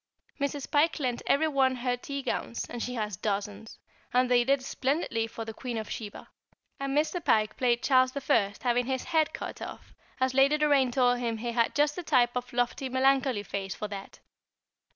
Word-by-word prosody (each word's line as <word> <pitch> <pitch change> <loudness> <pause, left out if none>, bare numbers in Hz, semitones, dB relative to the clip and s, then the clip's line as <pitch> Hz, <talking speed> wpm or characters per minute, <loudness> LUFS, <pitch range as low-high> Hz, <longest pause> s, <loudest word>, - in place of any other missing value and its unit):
Mrs. 280 0 -3
Pike 305 +3 +3
lent 250 -4 -1
every 315 +3 +3
one 265 -3 +2
her 250 0 -1
tea 275 +2 -6
gowns 235 -2 -3
she 250 +2 -3
has 210 -4 -3
dozens 205 +1 -4 0.3
and 250 0 +2
they 245 -1 +5
did 270 +1 +1
splendidly 260 -5 -1
for 225 0 -7
the 225 - -6
Queen 240 0 -5
of 220 -1 -5
Sheba; 210 -3 -7 0.5
and 275 +1 -1
Mr. 320 +3 0
Pike 215 -1 +2
played 240 -1 +1
Charles 255 -2 +4 0.2
I. 200 -3 +3
having 245 0 +1
his 260 -1 -1
head 320 -3 +1
cut - - -7
off, - - -9 0.3
as 260 0 +1
Lady 275 +3 +4
Doraine 285 -4 +3
told 245 -1 +3
him 230 -2 -2
he 235 +2 -3
had 235 -1 +1
just 295 0 +2
the 360 - -4
type 250 -7 +2
of 250 0 -3
lofty 245 +2 -1
melancholy 260 -3 +2
face 195 0 -4
for 210 - -4
that. 195 -1 -8
250 Hz, 190 wpm, -28 LUFS, 230-275 Hz, 0.5 s, they